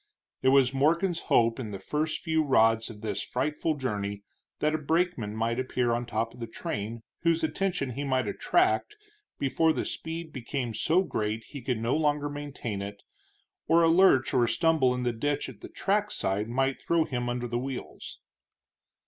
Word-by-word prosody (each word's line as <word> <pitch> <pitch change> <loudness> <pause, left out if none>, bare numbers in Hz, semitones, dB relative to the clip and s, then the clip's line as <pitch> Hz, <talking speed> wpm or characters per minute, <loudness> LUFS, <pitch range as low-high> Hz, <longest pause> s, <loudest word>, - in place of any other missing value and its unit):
It 130 - +4
was 135 -1 +5
Morgan's 165 +6 +2
hope 115 0 +4
in 115 -4 -4
the 100 - -5
first 150 - -2
few 160 -2 +2
rods 115 -5 +3
of 105 -2 -10
this 105 -3 -2
frightful 150 +4 -1
journey 100 -7 -3 0.3
that 150 0 +1
a 155 - 0
brakeman 155 - 0
might 115 +2 0
appear 125 -1 0
on 120 0 -1
top 115 0 -2
of 125 - -15
the 115 - -4
train, 110 0 -5 0.2
whose 165 -1 +1
attention 160 -4 -1
he 140 +4 -4
might 130 -4 0
attract 370 - +1 0.4
before 160 +4 +2
the - - -2
speed 160 -1 -5
became 125 -2 -3
so 165 - +2
great 110 - -2
he 140 +2 -9
could 125 0 -1
no 115 +3 0
longer 150 -1 +1
maintain 145 -8 -5
it, 100 0 -7 0.6
or 165 +1 +5
a 165 - +5
lurch 165 -6 +5
or 125 - +4
a - - -1
stumble 160 -7 +3
in 125 - -3
the 120 -1 0
ditch 145 +5 -1
at 120 -6 -11
the - - -9
trackside 190 - -1
might 135 +2 0
throw 170 -1 +2
him 120 -3 -2
under 120 0 -2
the 120 0 -1
wheels. 130 0 -6
130 Hz, 180 wpm, -28 LUFS, 115-155 Hz, 0.6 s, was